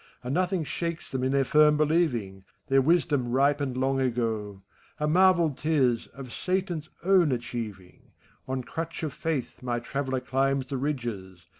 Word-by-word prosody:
And 125 +2 -3
nothing 185 0 +1
shakes 170 +2 -4
them 130 -1 -2
in 130 - +1
their 140 0 +3
firm 150 +2 +5
believing: 140 - +1 0.3
Their 135 0 +5
wisdom 150 -4 +2
ripened 140 0 +1
long 135 +1 +1
ago, 110 -6 -2 0.2
— - - -32
A 150 - 0
marvel 175 -1 +4
*t 150 +4 -3
is, 125 -7 +2
of 130 -3 -10
Satan's 180 -4 -2
own 180 -5 +4
achieving. 115 -6 -6 0.4
On 130 -1 -2
crutch 165 +5 -5
of 150 -4 -2
faith 150 -3 -3
my 120 -1 -1
traveller 130 +1 -2
climbs 135 +1 0
the 135 - -2
ridges. 115 - -4
135 Hz, 160 wpm, -27 LUFS, 125-155 Hz, 0.4 s, firm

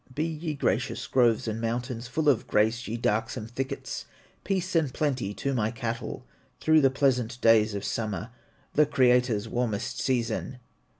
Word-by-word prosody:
Be 155 - 0
ye 160 -1 -3
gracious, - - -1
groves 120 -3 +2
and 110 +1 -2
mountains, 120 +1 -3
Full 150 +5 -1
of 140 -6 +3
grace, 110 +4 +1
ye 115 - -3
darksome 115 0 -1
thickets, 130 +4 -5 0.4
Peace 185 -2 -1
and 155 -5 +2
plenty 130 -8 -1
to 140 - -2
my 110 -4 +1
cattle, 115 0 -4 0.3
Through 155 0 +4
the 135 - +5
pleasant 125 -3 +1
days 110 -2 +4
of 100 - -4
summer, 110 0 -3 0.4
The 150 0 +4
Creator's 125 -5 +3
warmest 115 -3 -2
season. 125 0 -1
125 Hz, 155 wpm, -27 LUFS, 115-135 Hz, 0.4 s, the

